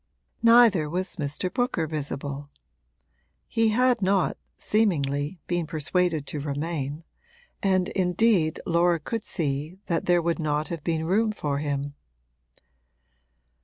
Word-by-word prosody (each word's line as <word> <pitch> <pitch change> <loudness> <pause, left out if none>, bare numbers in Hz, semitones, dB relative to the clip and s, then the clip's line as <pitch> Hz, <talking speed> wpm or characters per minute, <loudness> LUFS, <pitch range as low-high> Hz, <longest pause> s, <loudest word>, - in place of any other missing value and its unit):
Neither 230 -9 +6
was 185 +4 -3
Mr. 150 +4 -2
Booker 245 -10 0
visible; 145 -2 -4 1.0
he 225 -1 +2
had 245 +1 +3
not, 195 0 +2 0.2
seemingly, 150 -7 0
been 175 -2 -1
persuaded 160 0 0
to 150 - -4
remain, 145 +1 -3 0.6
and 185 -2 +2
indeed 180 -3 +2
Laura 170 0 +3
could 220 +8 -4
see 150 +1 -3
that 170 -3 -1
there 175 -1 +3
would 170 +1 0
not 150 -1 -1
have 165 -4 -5
been 160 -2 -1
room 215 +6 +2
for 145 -9 -2
him. 145 -1 -2
170 Hz, 120 wpm, -26 LUFS, 150-190 Hz, 1.0 s, Neither